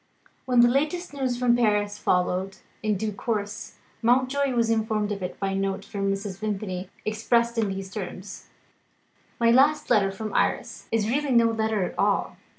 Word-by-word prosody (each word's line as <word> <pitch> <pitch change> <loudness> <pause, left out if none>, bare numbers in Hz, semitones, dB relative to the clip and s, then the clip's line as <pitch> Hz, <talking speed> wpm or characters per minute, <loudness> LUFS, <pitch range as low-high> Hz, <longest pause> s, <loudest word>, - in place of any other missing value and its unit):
When 250 -2 +4
the 240 - +7
latest 300 +7 0
news 260 -3 -1
from 245 -1 +3
Paris 210 -3 +1
followed, 185 0 0 0.2
in 215 -2 0
due 215 +2 -2
course, 210 0 -4 0.2
Mountjoy 260 +3 +2
was 230 -1 +2
informed 215 -2 0
of 200 -1 -4
it 180 - -5
by 195 - -1
a 195 - -2
note 195 0 -2
from 195 -1 -2
Mrs. 195 -1 -4
Vimpany 195 -3 -3 0.2
expressed 235 +2 +1
in 215 -3 +1
these 195 0 -5
terms: 195 -1 -7 0.9
"My 230 0 +4
last 290 +3 +3
letter 200 -4 +4
from 215 +2 -6
Iris - - -1
is 220 -2 +1
really 275 +3 0
no 230 -1 +5
letter 220 -2 0
at - - -5
all. - - +1
215 Hz, 170 wpm, -25 LUFS, 195-240 Hz, 0.9 s, the